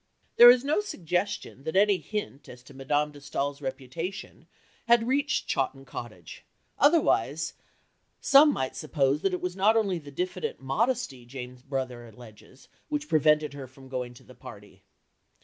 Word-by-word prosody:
There 240 Hz, 0 st, +11 dB
is 245 Hz, 0 st, +6 dB
no 295 Hz, +7 st, +2 dB
suggestion 180 Hz, -, -3 dB
that 160 Hz, +3 st, -4 dB
any 200 Hz, -1 st, +4 dB
hint 160 Hz, -7 st, -6 dB
as 125 Hz, 0 st, -12 dB
to 140 Hz, -, -15 dB
Madame 145 Hz, +3 st, -1 dB
de 145 Hz, -, -13 dB
Staël's 140 Hz, 0 st, -4 dB
reputation 145 Hz, +8 st, -6 dB, 0.4 s
had 235 Hz, -1 st, +4 dB
reached 285 Hz, +4 st, 0 dB
Chawton 135 Hz, 0 st, -2 dB
Cottage, 105 Hz, -10 st, -9 dB, 0.4 s
otherwise 300 Hz, +4 st, +2 dB, 0.7 s
some 285 Hz, +2 st, +6 dB
might 130 Hz, -, -3 dB
suppose 145 Hz, -1 st, 0 dB
that 195 Hz, -, +1 dB
it 180 Hz, -, -3 dB
was 180 Hz, 0 st, -3 dB
not 210 Hz, +4 st, +3 dB
only 195 Hz, -5 st, 0 dB
the 145 Hz, -2 st, -12 dB
diffident 180 Hz, +5 st, -4 dB
modesty 145 Hz, -, -1 dB
Jane's 125 Hz, 0 st, -9 dB
brother 130 Hz, -3 st, -5 dB
alleges 115 Hz, +3 st, -16 dB, 0.2 s
which 300 Hz, 0 st, -3 dB
prevented 150 Hz, -, +3 dB
her 140 Hz, -2 st, -8 dB
from 130 Hz, +1 st, -16 dB
going 125 Hz, -2 st, -5 dB
to -, -, -16 dB
the -, -, -16 dB
party. -, -, -13 dB
150 Hz, 155 wpm, -27 LUFS, 130-205 Hz, 0.7 s, There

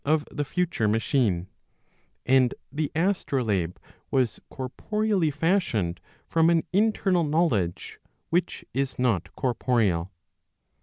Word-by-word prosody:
485 150 Hz, +1 st, +1 dB
of -, -, -15 dB
the 145 Hz, -, 0 dB
future 165 Hz, -8 st, 0 dB
machine; 105 Hz, -4 st, +1 dB, 0.8 s
and 130 Hz, -1 st, +4 dB, 0.2 s
the 150 Hz, +1 st, -2 dB
astrolabe 125 Hz, -, 0 dB, 0.3 s
was 125 Hz, -5 st, +1 dB
corporeally 195 Hz, -, -1 dB
fashioned 145 Hz, -, 0 dB, 0.3 s
from 165 Hz, 0 st, +3 dB
an 170 Hz, -1 st, +3 dB
internal 195 Hz, -3 st, +2 dB
knowledge 145 Hz, -, 0 dB, 0.3 s
which 175 Hz, +2 st, 0 dB
is 135 Hz, 0 st, -1 dB
not 100 Hz, -9 st, 0 dB
corporeal. 110 Hz, -8 st, +1 dB
135 Hz, 105 wpm, -26 LUFS, 110-165 Hz, 0.8 s, and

